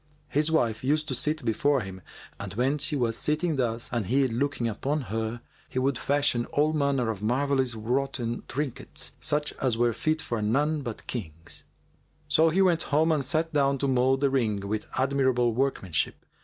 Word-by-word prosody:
[FN#405] -, -, -24 dB
His 150 Hz, +2 st, +2 dB
wife 115 Hz, -9 st, +1 dB
used 150 Hz, +3 st, +1 dB
to -, -, -1 dB
sit 150 Hz, +2 st, -1 dB
before 135 Hz, +5 st, +2 dB
him, 95 Hz, -2 st, -8 dB, 0.4 s
and -, -, -6 dB
when 135 Hz, +5 st, +1 dB
she 145 Hz, +1 st, +1 dB
was 120 Hz, -4 st, 0 dB
sitting 155 Hz, +5 st, 0 dB
thus 120 Hz, -2 st, 0 dB
and 115 Hz, -6 st, -1 dB
he 135 Hz, +3 st, +3 dB
looking 125 Hz, 0 st, -1 dB
upon 140 Hz, +7 st, -1 dB
her,[FN#406] 115 Hz, +1 st, -3 dB, 0.3 s
he -, -, -6 dB
would 130 Hz, -1 st, +1 dB
fashion 140 Hz, -4 st, +1 dB
all 150 Hz, +2 st, +1 dB
manner 140 Hz, -6 st, +1 dB
of 105 Hz, -3 st, -7 dB
marvellously 130 Hz, +1 st, +1 dB
wroughten 120 Hz, 0 st, -1 dB
trinkets, 140 Hz, -1 st, -3 dB
such 150 Hz, 0 st, 0 dB
as 125 Hz, -4 st, +1 dB
were 120 Hz, 0 st, +2 dB
fit 155 Hz, +7 st, 0 dB
for 115 Hz, -7 st, -2 dB
none 145 Hz, +8 st, +1 dB
but 120 Hz, -5 st, -6 dB
kings. 85 Hz, -8 st, -5 dB, 0.6 s
So 160 Hz, +1 st, +4 dB
he 190 Hz, +4 st, +3 dB
went 175 Hz, -3 st, +3 dB
home 155 Hz, +3 st, +3 dB
and 150 Hz, -3 st, +2 dB
sat 160 Hz, +4 st, 0 dB
down 140 Hz, -1 st, +3 dB
to 140 Hz, -, -1 dB
mould 130 Hz, +1 st, +2 dB
the 140 Hz, -1 st, +3 dB
ring 105 Hz, -7 st, 0 dB
with 105 Hz, +1 st, -3 dB
admirable 130 Hz, -3 st, +2 dB
workmanship. 115 Hz, -, -1 dB
130 Hz, 185 wpm, -27 LUFS, 115-145 Hz, 0.6 s, So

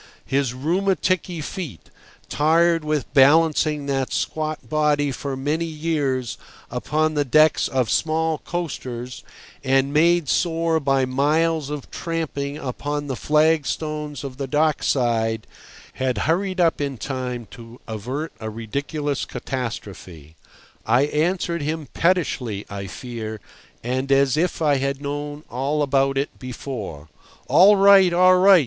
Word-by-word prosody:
His 135 Hz, -2 st, 0 dB
rheumaticky 180 Hz, +2 st, 0 dB
feet, 155 Hz, -, -7 dB, 0.4 s
tired 165 Hz, +2 st, +3 dB
with 150 Hz, -6 st, -2 dB
balancing 150 Hz, +1 st, +4 dB
that 135 Hz, -2 st, -1 dB
squat 155 Hz, -5 st, -3 dB
body 145 Hz, 0 st, +1 dB
for 135 Hz, 0 st, -4 dB
many 150 Hz, +5 st, -1 dB
years 150 Hz, -6 st, -2 dB, 0.3 s
upon 155 Hz, +1 st, 0 dB
the 145 Hz, -1 st, +1 dB
decks 155 Hz, +3 st, +4 dB
of 130 Hz, -3 st, 0 dB
small 160 Hz, -1 st, +1 dB
coasters, 125 Hz, -8 st, -5 dB, 0.4 s
and 135 Hz, +1 st, +2 dB
made 170 Hz, +1 st, +3 dB
sore 165 Hz, 0 st, +1 dB
by 135 Hz, -2 st, +2 dB
miles 150 Hz, +3 st, +1 dB
of 145 Hz, -2 st, -6 dB
tramping 150 Hz, -4 st, -3 dB
upon 145 Hz, +2 st, -4 dB
the 135 Hz, -2 st, -3 dB
flagstones 150 Hz, -1 st, 0 dB
of 130 Hz, -2 st, -7 dB
the 135 Hz, -1 st, -3 dB
dock 150 Hz, +2 st, +1 dB
side, 115 Hz, -4 st, 0 dB, 0.5 s
had 130 Hz, -3 st, -1 dB
hurried 185 Hz, +4 st, 0 dB
up 165 Hz, -3 st, +2 dB
in 140 Hz, -2 st, -2 dB
time 125 Hz, 0 st, -4 dB
to 115 Hz, +1 st, -12 dB
avert 125 Hz, +9 st, -4 dB
a 110 Hz, -, -5 dB
ridiculous 140 Hz, +6 st, -3 dB
catastrophe. 95 Hz, -, -6 dB, 0.5 s
I 120 Hz, +4 st, +3 dB
answered 170 Hz, +3 st, 0 dB
him 155 Hz, -1 st, -3 dB
pettishly, 140 Hz, -, 0 dB
I 100 Hz, -1 st, -5 dB
fear, 110 Hz, +1 st, -6 dB, 0.4 s
and 130 Hz, +3 st, -2 dB
as 135 Hz, -1 st, +4 dB
if 165 Hz, +1 st, 0 dB
I 145 Hz, -2 st, +3 dB
had 140 Hz, 0 st, -2 dB
known 145 Hz, +1 st, -5 dB
all 140 Hz, +4 st, -1 dB
about 135 Hz, -1 st, +1 dB
it 140 Hz, +2 st, -3 dB
before. 115 Hz, -, -7 dB, 0.4 s
"All 185 Hz, +9 st, +7 dB
right, 195 Hz, -2 st, +6 dB
all 185 Hz, +1 st, +5 dB
right! 190 Hz, 0 st, +7 dB
145 Hz, 130 wpm, -22 LUFS, 130-160 Hz, 0.5 s, All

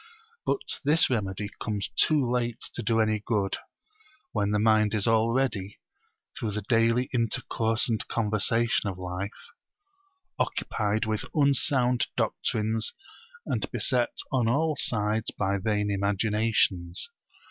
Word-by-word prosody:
But -, -, +2 dB, 0.3 s
this 150 Hz, 0 st, +4 dB
remedy 100 Hz, -3 st, -2 dB
comes 105 Hz, -3 st, -2 dB
too 150 Hz, -6 st, +2 dB
late 120 Hz, -1 st, -1 dB
to -, -, -2 dB
do 115 Hz, 0 st, +1 dB
any 110 Hz, -1 st, +2 dB
good, 105 Hz, -4 st, 0 dB, 0.7 s
when 105 Hz, -2 st, 0 dB
the 105 Hz, -, +1 dB
mind 110 Hz, 0 st, +3 dB
is 105 Hz, -, +1 dB
already, 115 Hz, -3 st, +1 dB, 0.6 s
through 105 Hz, -2 st, -3 dB
the 105 Hz, -, -3 dB
daily 115 Hz, +1 st, +2 dB
intercourse 115 Hz, -1 st, +1 dB
and 115 Hz, -3 st, -1 dB
conversation 115 Hz, 0 st, +1 dB
of 95 Hz, -, -6 dB
life, 90 Hz, +2 st, -4 dB, 1.1 s
occupied 105 Hz, +1 st, -1 dB
with 110 Hz, 0 st, -2 dB
unsound 135 Hz, -4 st, +3 dB
doctrines 110 Hz, +1 st, 0 dB, 0.5 s
and -, -, -2 dB
beset 125 Hz, -3 st, 0 dB
on 125 Hz, -4 st, +2 dB
all 155 Hz, +6 st, +1 dB
sides 105 Hz, -2 st, +1 dB
by 100 Hz, 0 st, 0 dB
vain 105 Hz, 0 st, 0 dB
imaginations. 100 Hz, -, +1 dB
110 Hz, 120 wpm, -27 LUFS, 105-120 Hz, 1.1 s, this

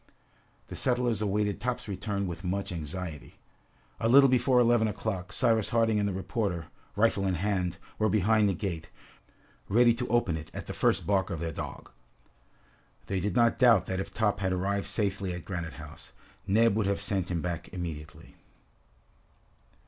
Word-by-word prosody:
The -, -, -6 dB
settlers 120 Hz, -4 st, 0 dB
awaited 105 Hz, 0 st, 0 dB
Top's 125 Hz, -1 st, -3 dB
return 100 Hz, 0 st, -3 dB
with 90 Hz, 0 st, -6 dB
much 95 Hz, +2 st, -2 dB
anxiety. 80 Hz, -1 st, -6 dB, 0.6 s
A 115 Hz, -, +1 dB
little 135 Hz, +2 st, +7 dB
before 130 Hz, 0 st, +3 dB
eleven 120 Hz, -2 st, +4 dB
o'clock, 100 Hz, -3 st, -4 dB
Cyrus 110 Hz, +2 st, +2 dB
Harding 115 Hz, -2 st, +2 dB
and 100 Hz, 0 st, +1 dB
the -, -, -2 dB
reporter, 95 Hz, -3 st, -3 dB, 0.3 s
rifle 100 Hz, -2 st, +2 dB
in 95 Hz, -, +1 dB
hand, 90 Hz, -2 st, -1 dB, 0.2 s
were 110 Hz, 0 st, +2 dB
behind 110 Hz, 0 st, +3 dB
the 95 Hz, -, 0 dB
gate, 85 Hz, -4 st, -4 dB, 0.8 s
ready 120 Hz, +3 st, +5 dB
to 125 Hz, +1 st, -3 dB
open 110 Hz, -9 st, +1 dB
it 80 Hz, 0 st, -9 dB
at -, -, -5 dB
the -, -, -5 dB
first -, -, +1 dB
bark 95 Hz, -2 st, +1 dB
of 85 Hz, -, -4 dB
their 80 Hz, 0 st, -3 dB
dog. -, -, -7 dB, 1.1 s
They 95 Hz, -, -2 dB
did 100 Hz, +3 st, -2 dB
not 120 Hz, -1 st, +3 dB
doubt 120 Hz, -6 st, +6 dB
that 95 Hz, 0 st, -3 dB
if 95 Hz, -, -4 dB
Top 110 Hz, -2 st, 0 dB
had 95 Hz, -1 st, 0 dB
arrived 100 Hz, +2 st, -1 dB
safely 100 Hz, -3 st, -1 dB
at 90 Hz, -, -8 dB
Granite 85 Hz, -4 st, -4 dB
House, 75 Hz, -1 st, -11 dB, 0.3 s
Neb 110 Hz, +2 st, +4 dB
would 110 Hz, -2 st, +1 dB
have 100 Hz, -, 0 dB
sent 95 Hz, -3 st, -1 dB
him 85 Hz, -3 st, -2 dB
back 85 Hz, -2 st, -4 dB
immediately. 80 Hz, -4 st, -7 dB
100 Hz, 170 wpm, -29 LUFS, 90-110 Hz, 1.1 s, little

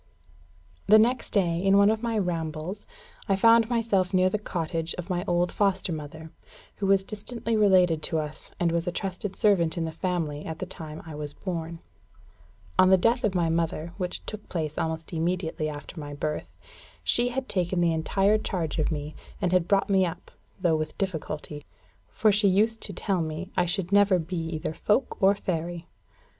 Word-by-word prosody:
The 215 Hz, +2 st, +8 dB
next 235 Hz, +3 st, +2 dB
day, 175 Hz, -5 st, +1 dB
in 195 Hz, +1 st, +4 dB
one 200 Hz, +1 st, +6 dB
of 220 Hz, 0 st, -2 dB
my 230 Hz, -2 st, -1 dB
rambles, 170 Hz, 0 st, -3 dB, 0.4 s
I 195 Hz, -, +4 dB
found 230 Hz, +3 st, +5 dB
myself 205 Hz, -6 st, +1 dB
near 185 Hz, 0 st, +4 dB
the 210 Hz, -, -1 dB
cottage 165 Hz, -4 st, -2 dB
of 180 Hz, +2 st, -6 dB
my 175 Hz, 0 st, -1 dB
old 175 Hz, 0 st, +1 dB
foster 195 Hz, -3 st, 0 dB
mother, 155 Hz, +1 st, -8 dB, 0.5 s
who 200 Hz, -, -1 dB
was 195 Hz, 0 st, +4 dB
distantly 225 Hz, +3 st, -4 dB
related 185 Hz, -6 st, +4 dB
to 160 Hz, -, 0 dB
us, 150 Hz, -1 st, -5 dB
and 170 Hz, -1 st, +2 dB
was 170 Hz, 0 st, -1 dB
a -, -, +1 dB
trusted 190 Hz, +2 st, -4 dB
servant 180 Hz, -7 st, +3 dB
in 165 Hz, -, 0 dB
the 160 Hz, -, -3 dB
family 160 Hz, -4 st, -2 dB
at 160 Hz, -1 st, -5 dB
the -, -, -4 dB
time 155 Hz, -1 st, -8 dB
I 160 Hz, -, -8 dB
was 150 Hz, -1 st, -6 dB
born. 170 Hz, -3 st, -5 dB, 1.0 s
On 185 Hz, 0 st, +7 dB
the 190 Hz, -, +7 dB
death 230 Hz, +6 st, +2 dB
of 205 Hz, -3 st, +1 dB
my 170 Hz, -2 st, +2 dB
mother, 165 Hz, 0 st, -1 dB
which 180 Hz, -2 st, -4 dB
took 215 Hz, -1 st, -6 dB
place 155 Hz, -3 st, -3 dB
almost 160 Hz, +2 st, -3 dB
immediately 165 Hz, -2 st, -1 dB
after 150 Hz, +3 st, -8 dB
my 145 Hz, -1 st, -6 dB
birth, 150 Hz, +1 st, -4 dB, 0.5 s
she 240 Hz, +1 st, +3 dB
had 260 Hz, +1 st, -3 dB
taken 180 Hz, -1 st, 0 dB
the 170 Hz, -1 st, +3 dB
entire 195 Hz, +6 st, +2 dB
charge 170 Hz, -6 st, -2 dB
of 155 Hz, -, +1 dB
me, 150 Hz, 0 st, -4 dB, 0.3 s
and 180 Hz, -, 0 dB
had 180 Hz, -2 st, +2 dB
brought 195 Hz, 0 st, +3 dB
me 195 Hz, -1 st, +3 dB
up, 175 Hz, 0 st, -5 dB, 0.3 s
though 175 Hz, -4 st, +2 dB
with 155 Hz, 0 st, -4 dB
difficulty; 155 Hz, -5 st, -4 dB, 0.5 s
for 215 Hz, -, +3 dB
she 205 Hz, 0 st, +3 dB
used 215 Hz, +4 st, +2 dB
to -, -, +1 dB
tell 190 Hz, -1 st, -1 dB
me, 160 Hz, +4 st, -5 dB
I 175 Hz, -, +2 dB
should 180 Hz, +1 st, -1 dB
never 200 Hz, -2 st, +5 dB
be 175 Hz, +2 st, -4 dB
either 155 Hz, -1 st, -3 dB
folk 210 Hz, +10 st, 0 dB
or 195 Hz, +1 st, +5 dB
fairy. 170 Hz, -2 st, -3 dB
180 Hz, 190 wpm, -27 LUFS, 160-200 Hz, 1.0 s, The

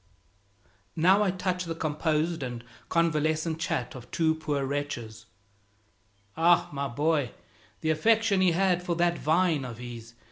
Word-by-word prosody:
Now 185 Hz, +5 st, +4 dB
I 205 Hz, -, +2 dB
touch 180 Hz, -1 st, -2 dB
the 165 Hz, -1 st, -4 dB
composed 155 Hz, +1 st, -1 dB
and 120 Hz, -3 st, -5 dB, 0.3 s
convalescent 160 Hz, -1 st, +1 dB
chat 125 Hz, -6 st, -2 dB
of 125 Hz, -2 st, -11 dB
two 160 Hz, -1 st, +2 dB
poor 150 Hz, -3 st, -2 dB
wretches 120 Hz, -6 st, -4 dB, 1.1 s
"Ah, 170 Hz, +1 st, +4 dB
my 140 Hz, 0 st, -2 dB
boy, 145 Hz, 0 st, 0 dB, 0.5 s
the 160 Hz, -, +1 dB
affection 220 Hz, +4 st, +3 dB
he 180 Hz, -2 st, +4 dB
had 180 Hz, 0 st, +2 dB
for 175 Hz, -1 st, -2 dB
that 175 Hz, 0 st, +1 dB
vine 160 Hz, -2 st, +2 dB
of 120 Hz, -3 st, -7 dB
his! 120 Hz, -1 st, -9 dB
160 Hz, 140 wpm, -28 LUFS, 140-175 Hz, 1.1 s, Now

